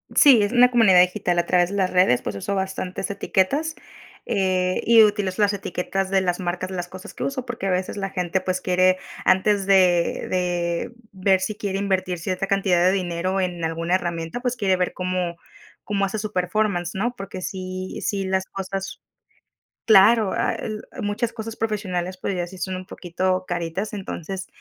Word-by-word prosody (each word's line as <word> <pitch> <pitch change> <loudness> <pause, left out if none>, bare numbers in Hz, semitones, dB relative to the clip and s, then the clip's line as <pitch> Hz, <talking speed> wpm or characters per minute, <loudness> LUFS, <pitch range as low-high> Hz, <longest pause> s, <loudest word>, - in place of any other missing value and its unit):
Sí, 265 -7 +7
es 205 - 0
una 250 0 +6
comunidad 210 -7 +6
digital 180 -1 +1
a 170 - +2
través 175 0 +2
de 200 - -5
las 190 -2 +1
redes, 180 -9 +3
pues 105 - -4
uso 200 - -3
bastantes 190 0 -3
etiquetas, 275 +11 0 0.5
eh, 185 -2 0
y 230 -1 +7
utilizo 205 -2 0
las 205 - +3
etiquetas 195 0 -3
de 195 -1 +2
las 180 0 -1
marcas 185 +1 -3
de - - -5
las 175 -1 -3
cosas 185 +1 -10
que - - -5
uso, 265 -2 -3
porque 225 -5 -4
a - - +1
veces 185 +2 -1
la 195 -1 -3
gente 180 +1 -1
pues 185 0 -1
quiere, 185 0 +3 0.3
antes 195 +1 +3
de 180 -3 +3
de 175 +2 -1 0.2
ver 190 0 +2
si 190 +3 -2
quiere 200 -2 -3
invertir 190 -2 -1
cierta 185 +3 -3
cantidad 190 -3 +2
de 185 - +5
dinero 185 0 -1
en 180 -2 -2
alguna 165 +2 0
herramienta, 170 +2 -3
pues, 250 0 -1
quiere 195 -5 +1
ver 180 0 -1
cómo 180 -2 -2 0.5
cómo 200 -1 0
hace 195 +3 -3
su 215 0 -4
performance, 180 -1 0
¿no? 240 +5 -1
Porque 195 -2 -7
sí 185 0 -5
sí 195 -2 -1
las 190 0 0
cosas, 195 0 -5 0.8
claro, 215 0 +6
ah, - - 0 0.5
muchas 210 +3 -2
cosas 225 -1 -7
profesionales, 185 -5 -2
pues, 195 - -3
ya 175 -1 -2
sí 190 +1 -11
son 185 +2 -3
un 185 - -8
poquito 185 +1 -2
caritas. 175 +4 -3
Entonces, 190 -2 -6
190 Hz, 185 wpm, -23 LUFS, 180-200 Hz, 0.8 s, Sí